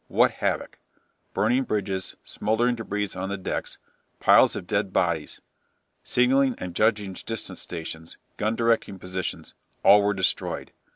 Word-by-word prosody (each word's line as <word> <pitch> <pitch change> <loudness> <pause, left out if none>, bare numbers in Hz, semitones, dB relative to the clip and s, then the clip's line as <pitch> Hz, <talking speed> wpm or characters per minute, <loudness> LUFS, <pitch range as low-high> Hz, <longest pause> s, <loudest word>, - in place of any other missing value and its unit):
What - - +4
havoc! - - -2 0.6
Burning 125 +2 +3
bridges, 95 -4 -2
smouldering 120 +3 0
débris 105 -4 -3
on 95 +1 -3
the 100 - -2
decks, 95 - -4 0.4
piles - - +6
of - - -5
dead - - -1
bodies. - - 0 0.6
Signalling 130 +1 +3
and 90 -1 -6
judging 105 -2 +1
distance 115 +4 -4
stations, 80 -1 -7 0.2
gun 110 +2 0
directing 115 -4 +1
positions, 90 0 -4 0.3
all 105 +1 +8
were 100 0 +1
destroyed. 95 -1 -1
105 Hz, 130 wpm, -25 LUFS, 95-115 Hz, 0.6 s, all